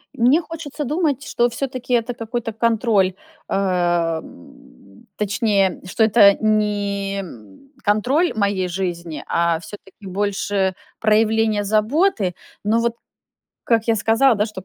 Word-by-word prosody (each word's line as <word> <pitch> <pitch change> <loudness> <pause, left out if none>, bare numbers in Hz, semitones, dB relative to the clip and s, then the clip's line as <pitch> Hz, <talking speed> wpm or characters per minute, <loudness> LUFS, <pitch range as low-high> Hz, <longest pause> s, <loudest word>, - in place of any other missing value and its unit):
Мне 255 +8 +4
хочется 305 -2 -6
думать, 295 -1 -1
что 240 - 0
всё-таки 255 0 -4
это 240 +1 +1
какой-то 230 0 -4
контроль, 225 -4 +2 0.4
а, 175 -4 0
м, 270 -3 -17
точнее, 205 -2 0
что 220 +4 0
это 210 -2 +6
не, 205 -2 0
м, 110 - -10 0.3
контроль 255 - +2
моей 200 -3 0
жизни, 170 -4 -4
а 170 -1 +1
всё-таки 195 +2 -12
больше 195 0 -1 0.3
проявление 220 0 +2
заботы. 215 - +1 0.3
Но 225 +2 +2
вот, 235 0 0 0.7
как 230 -1 +1
я 225 - +3
сказала, 225 +4 +3
да, 210 +1 +1
что 200 -4 -8
215 Hz, 125 wpm, -20 LUFS, 195-235 Hz, 0.7 s, это